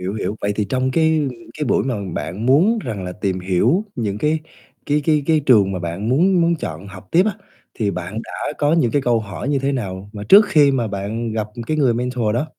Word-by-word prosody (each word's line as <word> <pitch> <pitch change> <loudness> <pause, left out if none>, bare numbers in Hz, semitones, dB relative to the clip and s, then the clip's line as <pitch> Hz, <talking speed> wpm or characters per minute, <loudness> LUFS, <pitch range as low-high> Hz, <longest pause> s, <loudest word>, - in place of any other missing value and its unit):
Hiểu, 95 +3 -3
hiểu. 105 0 -3
Vậy 100 - 0
thì 105 - 0
trong 130 +5 -1
cái 160 0 +2 0.3
cái 150 - -1
buổi - - +1
mà 130 -1 -1 0.2
bạn 90 +10 -4
muốn 180 - +4
rằng 100 -4 -4
là 90 - -5
tìm 95 -2 -2
hiểu 105 - +1
những 105 -4 -3
cái 155 +5 0 0.5
cái 150 +1 +2
cái 150 -1 +2
cái 160 -2 +3
trường 110 -9 +4
mà 95 - -3
bạn 85 +5 -4
muốn 175 +8 +3
muốn 170 0 +3
chọn 85 - -6
học 95 -1 -12
tiếp 180 +3 +4
á, 215 - +1 0.4
thì 105 -3 -1
bạn 90 +3 -5
đã - - -5
có 145 +1 +2
những 160 -8 +2
cái 145 +2 +1
câu 120 -3 +2
hỏi 105 +4 -6
như 145 -1 +1
thế 135 +1 -1
nào, 100 -6 -5
mà 105 - -7
trước 205 +2 +9
khi 150 -6 +5
mà 125 -4 0
bạn 105 +4 -4
gặp 110 -1 -2 0.2
cái 155 - -1
người 135 -6 +3
mentor 120 -2 -1
đó. 130 +6 0
120 Hz, 240 wpm, -20 LUFS, 100-150 Hz, 0.5 s, trước